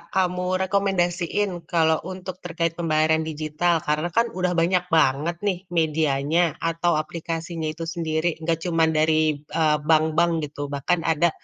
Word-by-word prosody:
kamu 180 0 0
rekomendasiin 190 0 0 0.2
kalau 160 -2 +3
untuk 185 -1 -7
terkait 165 -1 -1
pembayaran 160 -1 +2
digital? 155 +2 0
Karena 155 +3 0
kan 230 +1 +3
udah 180 -1 0
banyak 180 +2 +2
banget 160 +2 +2
nih 185 -3 0
medianya 155 0 +1
atau 165 +1 +1
aplikasinya 165 +1 -4
itu 165 +1 -6
sendiri, 165 0 -1
nggak 165 -1 0
cuman 165 -1 +3
dari, 155 -1 +2
eee, 150 0 +1
bank-bank 160 +2 +3
gitu, 145 0 -6
bahkan 165 +5 0
ada, 165 +1 +3
165 Hz, 135 wpm, -24 LUFS, 155-175 Hz, 0.2 s, kalau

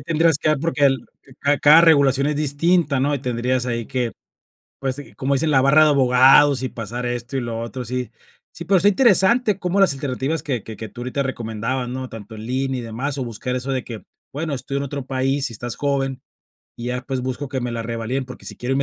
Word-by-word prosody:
tendrías 165 +1 +2
que 155 - 0
dar 155 -2 +2
porque 145 -2 0
el 135 -1 +2 0.3
ca 145 0 +2
cada 150 +3 +7
regulación 140 -4 +4
es 150 0 0
distinta, 150 0 +1
¿no? 145 +2 +1
Y - - -2
tendrías 125 0 -1
ahí 115 -2 -2
que, 125 -3 -2 0.7
pues, 135 +1 -3 0.2
como 140 +1 0
dicen, 155 +3 +1
la 135 -3 +4
barra 150 +4 +5
de 155 - +4
abogados 135 +1 +5
y 130 - -1
pasar 120 +1 -5
esto 120 +2 -4
y - - 0
lo 115 -2 -4
otro, 125 +2 -5
sí. 125 +1 -4 0.4
Sí, 170 - -8
pero 190 +3 +3
está 200 - +4
interesante 210 0 +4
cómo 180 +2 0
las 195 -6 +5
alternativas 140 +3 -2
que 130 -9 -3
que 110 - -9
que 110 +2 -7
tú 120 - -9
ahorita 130 +3 -2
recomendabas, 120 0 -3
¿no? 130 +1 -5
Tanto 110 0 -10
en 110 +1 -8
línea 130 0 -1
y - - -7
demás, 125 +5 -4
o 130 - -2
buscar 120 +2 -4
eso 130 +2 -3
de 130 -2 -2
que, 115 -3 -8 0.3
bueno, 155 +1 -3
estoy 135 +2 -4
en - - -3
otro 140 -1 -5
país 135 +1 0
y - - -9
estás 120 +2 -5
joven 135 -2 -1 0.5
y 120 - -7
ya, 125 +1 -2
pues, 130 0 -3
busco 130 +2 -4
que 130 -2 -3
me 120 -1 -3
la 115 - -3
revaliden, 115 +3 -3
porque 125 - -12
sí - - -7
quiero 125 +2 -3
irme 140 - +1
130 Hz, 235 wpm, -21 LUFS, 125-145 Hz, 0.7 s, cada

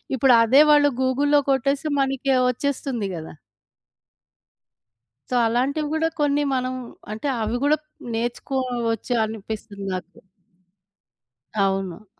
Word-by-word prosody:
ఇప్పుడు 260 0 +4
అదే 260 +6 +6
వాళ్ళు 290 -1 +5
గూగుల్లో 285 +3 +3
కొట్టేస్తే 275 +3 0
మనకి 270 0 0 0.2
వచ్చేస్తుంది 250 -4 -2
గదా! 160 -1 -8 2.0
సో, 250 - -1
అలాంటివిగూడా 295 +7 0
కొన్ని 290 0 +2
మనం 255 0 -1 0.4
అంటే 220 +7 -4
అవి 220 +2 -1
గూడా 295 +2 +3 0.4
నేర్చుకోవచ్చు 240 -1 -2
అనిపిస్తుంది 215 -1 -7
నాకు. 185 0 -7 1.3
అవును. 195 -1 -1
255 Hz, 95 wpm, -23 LUFS, 220-280 Hz, 2.0 s, అదే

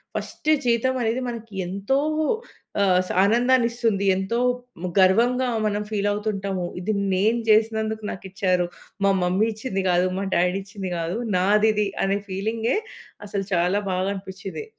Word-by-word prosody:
First 305 - -4 0.2
జీతమనేది 240 0 +1
మనకి 230 -3 -8
ఎంతో 200 +8 0 0.8
ఆహ్, 185 -2 +4
స్ - - -4
ఆనందాన్నిస్తుంది. 235 -2 +2
ఎంతో 195 +5 -1 0.5
ము 180 - -1
గర్వంగా 240 +7 +4 0.2
మనం 210 0 0
ఫీల్ 205 -1 0
అవుతుంటాము. 200 -3 -2
"ఇది 215 +4 -1 0.2
నేను 215 +5 +2
చేసినందుకు 220 0 +2
నాకిచ్చారు. 185 -1 -1 0.4
మా 195 - +5
మమ్మీ 185 +5 +2
ఇచ్చింది 210 -4 -3
కాదు, 180 +1 +3
మా 195 - -2
డ్యాడీ 180 +2 +2
ఇచ్చింది 195 -1 -6
కాదు, 170 +5 -2 0.2
నాదిది" 210 +2 +3 0.2
అనే 195 +1 +1
ఫీలింగే 220 - -1 0.5
అసలు 200 -1 -3
చాలా 180 +3 +2
బాగా 185 +1 0
అనిపించింది. 195 - -7
205 Hz, 130 wpm, -24 LUFS, 190-225 Hz, 0.8 s, మా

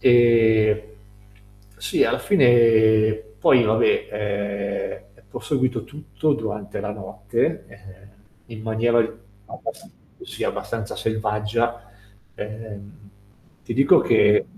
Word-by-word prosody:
Ehm, 115 -3 +4 1.0
sì, 100 +2 0
alla - - 0
fine 115 - +4 0.2
poi 120 +2 +4
vabbè, 110 +1 +1 1.0
ehm, 100 - -26
ho - - -6
seguito 130 -5 -1
tutto 150 +1 -3
durante 105 -4 -5
la 105 0 -4
notte, 100 0 -3
ehm, 100 -1 -16 0.4
in 115 -2 -10
maniera 115 +2 +1 0.5
abbas - - -9 0.3
sì, - - -6
abbastanza 115 -3 -4
selvaggia. 110 +1 -2 0.4
Ehm, 105 -1 -10 0.6
ti 115 - -5
dico 135 +2 +5
che 425 +1 +3
110 Hz, 100 wpm, -22 LUFS, 105-120 Hz, 1.0 s, dico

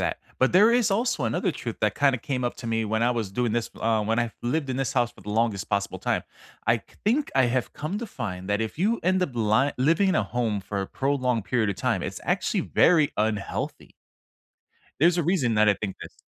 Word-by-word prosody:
that, - - -1 0.2
but 130 - +3
there 210 +6 +6
is 235 -3 +3
also 200 - 0
another 120 +10 0
truth 120 -6 -6
that 105 -1 +1
kinda 140 -3 +2
came 130 +2 -3
up 120 - -2
to 120 - -8
me 115 -1 0
when 110 +1 -1
I 120 +1 +3
was 115 -5 -3
doing 115 +2 -1
this 115 -1 -1
uh, 110 -1 +2
when 115 +2 0
I 120 -2 0
lived 140 +3 -1
in 130 - -2
this 135 0 -1
house 120 -3 +1
for - - -18
the 105 - -7
longest 110 -3 0
possible 100 -1 -1
time. - - 0 0.4
I - - +4
c - - -20 0.2
think 275 +7 +1
I 130 - +5
have 125 0 -1
come 160 +7 -4
to 235 - -5
find 95 - -6
that 105 +1 +1
if 110 -1 -3
you 210 +8 +1
end 185 +1 +2
up 180 - -1
ly 115 +5 +2
living 165 +9 +3
in 190 - +2
a - - +2
home 115 -4 -1
for 100 +1 -4
a 95 - -3
prolonged 125 -4 0
period 110 -4 +1
of 100 - -4
time, - - 0
it's - - -5
actually - - 0
very 160 -4 +3
unhealthy. 105 -2 -2 1.1
There's 170 +2 +5
a 175 - +1
reason 155 -9 +1
that 105 0 +4
I 105 - +6
think 100 -3 -4
this. - - -12
120 Hz, 240 wpm, -25 LUFS, 110-155 Hz, 1.1 s, there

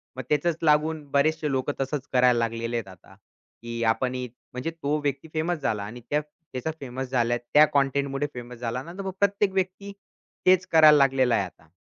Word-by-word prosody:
मग 130 - -5
त्याचच 155 +2 +1
लागून 155 0 +2
बरेचसे 155 +1 +1
लोकं 135 +2 -1
तसच 135 +1 -3
करायला 125 -1 +5
लागलेले 115 +1 -2
आहेत 110 -4 -4
आता, 95 -2 -15
की 115 0 -9
आपण 125 +3 +1
ही 125 0 -3 0.3
म्हणजे 125 +6 -3
तो 150 -2 -2
व्यक्ती 140 +2 -2
फेमस 160 +1 -1
झाला 105 -6 -1
आणि 115 +4 -8
त्या 150 +1 +1
त्याचा 150 -1 -7
फेमस 130 -1 -5
झाल्या 120 -2 +1 0.2
त्या 150 +1 +8
कंटेंटमुळे 140 +1 +1
फेमस 125 0 -8
झाला 125 +1 -3
ना, 170 - -10
तर 195 - -6
मग 190 -1 -4
प्रत्येक 200 0 +2
व्यक्ती, 190 +1 -2 0.5
तेच 185 0 +5
करायला 155 -2 +8
लागलेला 135 -3 +3
आहे - - +1
आता. 80 -3 -15
140 Hz, 190 wpm, -26 LUFS, 125-155 Hz, 0.5 s, त्या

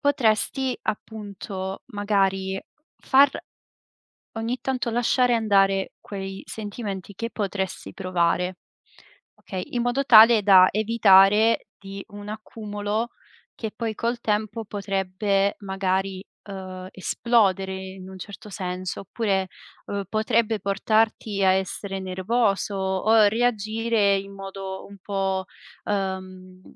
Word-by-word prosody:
potresti 265 -1 +1
appunto, 200 -3 -5
magari 195 -3 0 0.4
far 275 0 +5 1.1
ogni 230 +3 -2
tanto 255 -2 -1
lasciare 245 +1 +3
andare 195 -3 +2
quei 195 -1 -6
sentimenti 205 -3 -6
che 230 +4 -4
potresti 195 -2 -3
provare, 180 -1 0 0.8
okay, 185 -2 -6
in 240 - 0
modo 245 +3 0
tale 225 -1 +8
da 185 -2 +7
evitare 215 0 +5
di 195 0 -8
un 205 0 -9
accumulo 215 +1 -4 0.5
che 220 -2 -5
poi 225 -1 -2
col 235 +2 -1
tempo 215 +1 -1
potrebbe 195 0 0
magari, 190 -1 -2 0.3
uhm, 185 -1 -7
esplodere 195 -2 +1
in 190 0 -8
un 190 - -10
certo 205 +2 -9
senso. 185 -2 -4
Oppure, 195 -1 -1 0.4
uhm, 200 -1 -3
potrebbe 220 0 +1
portarti 215 0 +1
a 190 - +5
essere 190 +1 -2
nervoso 195 +2 0
o 195 +3 +3
reagire 220 -2 +1
in 195 0 -7
modo 195 -1 -7
un 200 - -13
po', 195 -1 -1 0.4
ehm, 185 -2 -4
200 Hz, 110 wpm, -24 LUFS, 190-220 Hz, 1.1 s, tale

